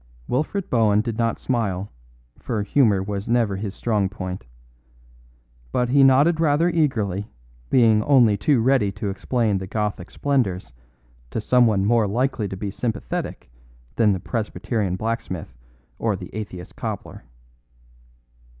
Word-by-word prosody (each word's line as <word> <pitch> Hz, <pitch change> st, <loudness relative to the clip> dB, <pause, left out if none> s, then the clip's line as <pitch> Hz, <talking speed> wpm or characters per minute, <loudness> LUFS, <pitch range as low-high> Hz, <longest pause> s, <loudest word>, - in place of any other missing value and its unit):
Wilfred 155 Hz, +9 st, -1 dB
Bohun 110 Hz, -3 st, +3 dB
did 115 Hz, 0 st, -4 dB
not 115 Hz, -1 st, +1 dB
smile, 105 Hz, -6 st, -2 dB, 0.5 s
for 110 Hz, -4 st, -2 dB
humour 105 Hz, -4 st, +3 dB
was 100 Hz, +1 st, -4 dB
never 115 Hz, -4 st, +2 dB
his 100 Hz, 0 st, -5 dB
strong 105 Hz, -5 st, 0 dB
point. 90 Hz, -9 st, -6 dB, 1.2 s
But 125 Hz, -1 st, 0 dB
he 140 Hz, +2 st, +5 dB
nodded 140 Hz, +5 st, +5 dB
rather 160 Hz, +2 st, +3 dB
eagerly, 110 Hz, -, 0 dB, 0.4 s
being 110 Hz, -4 st, +4 dB
only 125 Hz, -7 st, +5 dB
too 120 Hz, +5 st, +2 dB
ready 125 Hz, -5 st, +3 dB
to 105 Hz, -1 st, -3 dB
explain 105 Hz, +1 st, 0 dB
the 95 Hz, -, -6 dB
Gothic 105 Hz, -3 st, -3 dB
splendours 100 Hz, -, -1 dB, 0.6 s
to -, -, -3 dB
someone 110 Hz, -4 st, +3 dB
more 115 Hz, -1 st, +3 dB
likely 120 Hz, 0 st, 0 dB
to 95 Hz, -, -6 dB
be 100 Hz, +1 st, -4 dB
sympathetic 105 Hz, -, -4 dB, 0.4 s
than 110 Hz, -3 st, +4 dB
the 95 Hz, -, 0 dB
Presbyterian 105 Hz, -1 st, -2 dB
blacksmith 100 Hz, -, -4 dB, 0.4 s
or -, -, 0 dB
the -, -, -9 dB
atheist 95 Hz, -4 st, -7 dB
cobbler. -, -, -6 dB
110 Hz, 130 wpm, -23 LUFS, 100-125 Hz, 1.2 s, he